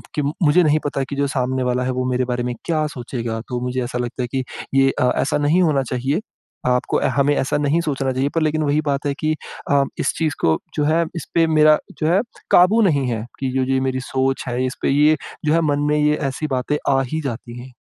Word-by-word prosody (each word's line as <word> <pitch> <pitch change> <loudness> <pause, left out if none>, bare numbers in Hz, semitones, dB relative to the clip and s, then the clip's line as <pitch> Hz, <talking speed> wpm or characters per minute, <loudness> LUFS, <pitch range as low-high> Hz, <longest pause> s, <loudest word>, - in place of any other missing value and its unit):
कि 150 - +1 0.2
मुझे 160 +4 +5
नहीं 155 -1 +3
पता 140 -1 -1
कि 140 - -4
जो 140 0 +1
सामने 130 -1 -1
वाला 125 0 0
है 130 - -1
वो 130 0 -2
मेरे 125 0 +1
बारे 125 -1 -2
में 125 - -2
क्या 155 -3 0
सोचेगा। 120 -4 -5
तो 125 -1 -2
मुझे 125 0 -2
ऐसा 120 0 -4
लगता 125 +1 -3
है - - -2
कि 130 - 0 0.3
ये 135 0 +5
अ, 125 0 +3
ऐसा 140 - 0
नहीं 150 +5 +2
होना 145 -5 +2
चाहिए, 135 - 0 0.5
आपको 125 0 +1 0.2
हमें 145 +1 +3
ऐसा 135 +2 0
नहीं 145 +3 +1
सोचना 135 -4 -1
चाहिए 135 +2 0
पर 165 - +2
लेकिन 155 0 +1
वही 145 +1 +2
बात 140 0 -1
है 140 - 0
कि 155 0 0 0.4
अ, 140 -1 +4 0.2
इस - - 0
चीज़ 155 -3 0
को 80 - +3 0.2
जो 150 - +2
है 160 +2 +3
इसपे 165 0 0
मेरा 155 -1 +5 0.2
जो 155 - 0
है 185 +5 +3 0.3
काबू 200 +6 +6
नहीं 140 -5 +1
है 115 -1 -3
कि 135 -1 -2
जो 130 - +2
ये 130 - +2
मेरी 130 0 -2
सोच 135 0 0
है 125 +2 -1
इसपे 130 - -2
ये 150 +3 +4 0.3
जो 150 - +3
है 165 - +3
मन 145 - 0
में 150 - +2
ये 150 0 +3
ऐसी 155 +4 -4
बातें 145 +4 -1 0.2
आ 135 - +3
ही 160 0 -1
जाती 120 -2 -6
है। 130 +1 -11
140 Hz, 240 wpm, -20 LUFS, 125-155 Hz, 0.5 s, काबू